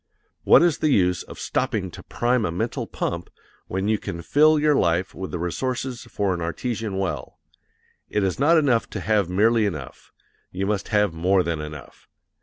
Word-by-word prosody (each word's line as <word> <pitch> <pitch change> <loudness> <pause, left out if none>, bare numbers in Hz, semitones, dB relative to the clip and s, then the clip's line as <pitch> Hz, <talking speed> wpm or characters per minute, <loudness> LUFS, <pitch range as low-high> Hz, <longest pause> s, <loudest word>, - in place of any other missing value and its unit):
What - - +7
is 170 -3 +2
the 155 - +2
use 90 -8 +2
of - - -11
stopping - - -2
to - - -10
prime 120 0 0
a 85 - -1
mental 85 - -3
pump 85 0 -4 0.4
when 95 +2 -2
you 110 -1 +1
can 85 0 -6
fill 155 - +4
your 150 0 +3
life 90 - +1
with 95 0 -6
the 90 - -4
resources 125 +8 -3
for 100 -2 -1
an 85 - -4
artesian 105 +4 -3
well? 95 -2 -3 0.7
It 105 - 0
is 95 +3 -1
not 160 +4 +5
enough 130 -7 +2
to - - -3
have 100 0 +1
merely 110 +3 +3
enough; 75 -9 -7 0.4
you 95 +2 -3
must 100 -1 -1
have 105 -4 +2
more 90 +3 +2
than 85 -2 -2
enough. 75 -2 -10
100 Hz, 185 wpm, -23 LUFS, 90-120 Hz, 0.7 s, What